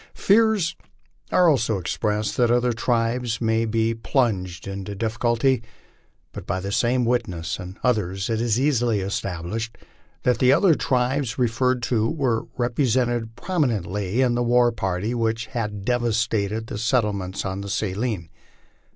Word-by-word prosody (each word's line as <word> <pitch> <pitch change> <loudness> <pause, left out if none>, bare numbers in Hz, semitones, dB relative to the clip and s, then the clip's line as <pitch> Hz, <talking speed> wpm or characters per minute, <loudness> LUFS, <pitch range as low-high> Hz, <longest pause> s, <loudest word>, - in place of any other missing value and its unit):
Fears 215 -5 +3 0.6
are 180 - +5
also 115 -8 +2
expressed 105 +4 -1
that 120 -2 +3
other 120 0 +2
tribes 115 0 0
may 115 0 +1
be 115 0 +1
plunged 105 - -1
into 100 +1 -5
difficulty, 115 +3 +1 0.7
but - - -9
by 90 +2 -1
the 100 +2 -4
same 120 +3 +2
witness 90 -10 -1
and 95 +2 -8
others 100 -6 0
it 115 -1 -1
is 120 -1 +1
easily 120 -7 +2
established 100 +3 -4 0.5
that 125 -2 +2
the 130 0 +5
other 170 +5 +5
tribes 130 -2 0
re 125 -2 +3
ferred 125 +2 0
to 115 -2 +1
were 130 -8 -1
represented 120 -2 0
prominently 115 - 0
in 125 -2 +2
the 120 - 0
war 120 0 +4
party 95 0 -2
which 115 -1 -1
had 105 -5 -4
devastated 115 -3 0
the 105 - -6
settlements 105 -6 0
on 95 +1 -3
the 100 - -6
Saline. 100 -2 -2
115 Hz, 140 wpm, -23 LUFS, 105-125 Hz, 0.7 s, are